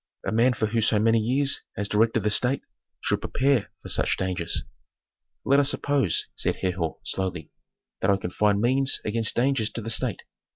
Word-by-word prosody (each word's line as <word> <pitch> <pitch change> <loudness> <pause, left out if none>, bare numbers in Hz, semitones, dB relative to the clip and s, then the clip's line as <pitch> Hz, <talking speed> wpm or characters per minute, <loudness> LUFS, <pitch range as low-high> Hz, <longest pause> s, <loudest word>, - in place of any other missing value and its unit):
A - - -1
man 120 +3 +3
who 110 - -1
for 115 +2 -1
so 110 0 +3
many 115 +2 +3
years 135 +5 +2 0.2
has 100 +1 -1
directed 110 +2 +1
the 105 - +1
state 125 +5 +2 0.4
should - - -1
prepare 130 -5 0
for - - -8
such - - +2
dangers." 90 -3 -1 0.8
"Let 140 +1 +4
us 140 -1 +3
suppose," 140 - 0
said - - +1
Herhor, 90 -3 -3
slowly, 95 -3 -4 0.5
"that 95 - 0
I 100 - +4
can 90 -2 -6
find 105 +1 +2
means 130 +4 +2
against 110 +1 +1
dangers 125 -3 +1
to 115 - -5
the 115 - -3
state. - - -2
110 Hz, 180 wpm, -25 LUFS, 100-130 Hz, 0.8 s, Let